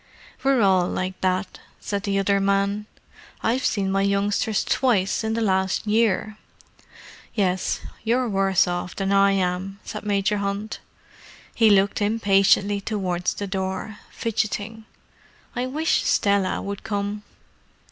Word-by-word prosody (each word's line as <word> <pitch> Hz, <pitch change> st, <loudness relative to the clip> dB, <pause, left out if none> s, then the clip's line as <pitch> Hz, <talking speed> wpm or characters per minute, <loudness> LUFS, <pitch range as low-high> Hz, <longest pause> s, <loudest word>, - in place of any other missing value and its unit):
"We're 270 Hz, -3 st, +3 dB
all 185 Hz, -2 st, +4 dB
like 185 Hz, +1 st, -4 dB
that," 185 Hz, 0 st, -1 dB, 0.2 s
said 200 Hz, -1 st, -3 dB
the 200 Hz, -1 st, -1 dB
other 195 Hz, 0 st, +2 dB
man. 200 Hz, +1 st, 0 dB, 0.6 s
"I've 245 Hz, +4 st, +1 dB
seen 195 Hz, -3 st, 0 dB
my 195 Hz, 0 st, +1 dB
youngsters 200 Hz, +2 st, +1 dB
twice 220 Hz, -7 st, +1 dB
in 220 Hz, 0 st, -1 dB
the 230 Hz, -, -1 dB
last 190 Hz, -1 st, +1 dB
year." 215 Hz, -1 st, +1 dB, 1.0 s
"Yes, 185 Hz, -3 st, 0 dB, 0.2 s
you're 245 Hz, +3 st, +1 dB
worse 195 Hz, -3 st, +2 dB
off 175 Hz, 0 st, -3 dB
than 195 Hz, 0 st, -1 dB
I 200 Hz, 0 st, +4 dB
am," 190 Hz, +1 st, -2 dB
said -, -, -7 dB
Major 205 Hz, 0 st, +1 dB
Hunt. 200 Hz, +2 st, -3 dB, 0.7 s
He 225 Hz, -2 st, +4 dB
looked 200 Hz, 0 st, +3 dB
impatiently 200 Hz, -1 st, +3 dB
towards 185 Hz, -4 st, -2 dB
the 205 Hz, -, -4 dB
door, 190 Hz, +2 st, -4 dB
fidgeting. 220 Hz, 0 st, -3 dB, 0.7 s
"I 250 Hz, +1 st, -1 dB
wish 310 Hz, +5 st, +1 dB
Stella 200 Hz, -2 st, +1 dB
would 200 Hz, 0 st, -5 dB
come." 205 Hz, -1 st, -3 dB
200 Hz, 130 wpm, -23 LUFS, 195-215 Hz, 1.0 s, all